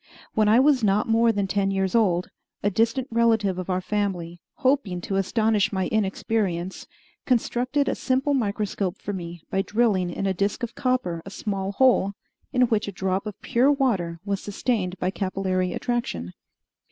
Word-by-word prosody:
When 215 -1 +3
I 225 +3 +6
was 270 -3 +4
not 205 0 +2
more 230 +1 +4
than 200 -2 -1
ten 195 0 0
years 195 -1 0
old, 185 -7 +2 0.3
a 205 - +2
distant 230 +6 +1
relative 225 -5 +2
of 185 - -5
our 185 0 0
family, 180 -4 -2
hoping 260 -10 +1
to 195 - -3
astonish 215 +1 +2
my 190 -2 -1
inexperience, 195 -3 -1 0.4
constructed 255 +3 +1
a - - +1
simple 270 +2 0
microscope 205 -5 -1
for 205 - -5
me 170 -3 -7
by 195 - +2
drilling 205 -4 +1
in 175 - -3
a 195 - +1
disk 200 +6 -1
of 235 - -3
copper 255 -11 -1
a - - -9
small 195 -1 -3
hole 220 -4 +3 0.4
in 250 -1 +3
which 220 -4 +1
a - - -3
drop 190 +2 -2
of 210 - -7
pure 255 +4 +3
water 200 - 0
was 200 -1 -2
sustained 200 -3 -2
by 185 +1 -1
capillary 185 -2 -1
attraction. 175 - -3
200 Hz, 170 wpm, -25 LUFS, 185-235 Hz, 0.4 s, I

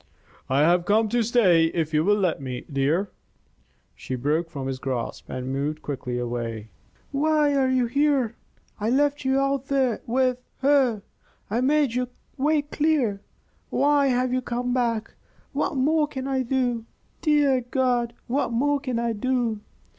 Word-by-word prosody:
"I 135 +2 +3
have 175 +3 +3
come 215 +2 +3
to 240 +1 +1
stay 210 -8 +4
if 165 -1 -2
you 155 0 +3
will 205 +3 +3
let 180 -8 0
me, 125 -2 -5
dear." 155 +9 +1 0.8
She 130 - -6
broke 150 +6 0
from 140 -5 -6
his 135 -1 -3
grasp 130 -3 -4
and 130 +1 -4
moved 150 +3 -2
quickly 125 -3 -4
away. 115 -3 -4 0.4
"Why 300 0 +2
are 270 -2 +2
you 255 -1 +2
here? 270 -2 +1 0.4
I 215 +2 0
left 290 +3 +1
you 265 +1 +2
out 275 -1 0
there 265 -5 +1
with 255 +1 +1 0.2
her. 265 -7 +3 0.5
I 230 +3 +1
made 285 -1 +2
your 250 0 -1 0.3
way 295 +2 +1
clear. 290 -9 0 0.5
Why 285 -1 +3
have 250 -1 +1
you 255 - +1
come 245 0 -2
back? 230 -3 -1 0.4
What 320 - -1
more 300 +3 +2
can 265 -2 -5
I 265 -1 0
do? 245 -2 -1 0.4
Dear 290 -4 +3
God! 245 -3 +1
What 260 0 -1
more 285 +5 +1
can 255 -4 -3
I 235 0 0
do?" 235 -1 -1
245 Hz, 160 wpm, -25 LUFS, 170-275 Hz, 0.8 s, stay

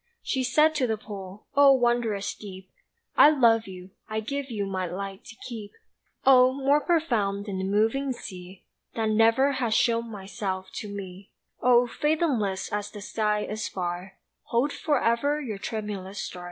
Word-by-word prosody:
She 265 -2 -1
said 305 +5 +4
to 275 -5 +1
the 220 -1 -1
pool: 200 -2 -9
"Oh, 280 -1 +7
wondrous 240 -5 +1
deep, 190 -2 -11 0.4
I - - +8
love 230 -7 +4
you, 185 0 -10 0.2
I 215 0 -1
give 275 +5 -4
you 210 -4 -2
my 190 -2 -2
light 195 +2 -6
to 245 -4 -11
keep. 220 -4 -8 0.5
Oh, 255 -1 +7
more 280 +2 +2
profound 230 - 0
than 195 -3 -4
the 190 - -2
moving 225 +8 +1
sea 185 -5 -9 0.3
That 225 -1 0
never 225 +6 +4
has 240 -5 0
shown 230 0 +2
myself 190 -2 -5
to 210 - -5
me! 195 -1 -8 0.3
Oh, 245 0 +5
fathomless 250 - -1
as 205 0 -2
the 210 - -10
sky 210 0 -1
is 210 0 -3
far, 180 +1 -5 0.3
Hold 250 +5 0
forever 285 0 +1
your 225 -9 -5
tremulous 205 -3 -5
star!" 180 - -5
220 Hz, 160 wpm, -26 LUFS, 195-255 Hz, 0.5 s, I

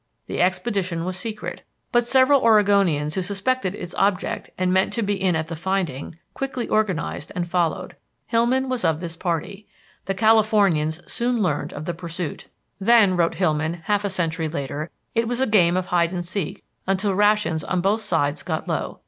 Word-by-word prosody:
The - - -2
expedition 185 -2 0
was 185 0 -3
secret, 215 +3 -6 0.3
but 240 -1 +2
several 265 +2 +5
Oregonians 200 - +3
who 190 - -1
suspected 200 +2 -1
its 180 -3 -7
object 195 -1 0
and 185 0 +1
meant 190 +1 +2
to 230 - -1
be 205 0 0
in 190 -3 +1
at 160 0 -1
the 165 - -5
finding, 170 -4 -3 0.2
quickly 265 -3 -3
organized 190 -8 -1
and 175 -1 -2
followed. 170 -2 -1 0.3
Hillman 245 +3 +1
was 255 -4 -2
of 160 -3 +2
this 165 -1 -5
party. 185 +4 -3 0.4
The 195 - -2
Californians 200 -7 +3
soon 240 0 -1
learned 150 -6 -1
of 155 - -6
the 175 - -2
pursuit. 170 -2 -6 0.3
"Then," 205 -2 +5
wrote 170 -1 +1
Hillman 160 -2 0
half 205 +1 +1
a 200 - 0
century 165 -3 -1
later, 150 +1 -4 0.2
"it 230 0 +1
was 245 +1 -1
a 265 - +3
game 185 -6 +4
of 185 - -1
hide 170 -1 +1
and 175 -1 -3
seek 185 -2 -4 0.2
until 195 +1 +1
rations 205 -5 +2
on 185 - -1
both 200 +5 +1
sides 160 -8 0
got - - -3
low. - - -3
185 Hz, 180 wpm, -23 LUFS, 170-215 Hz, 0.4 s, several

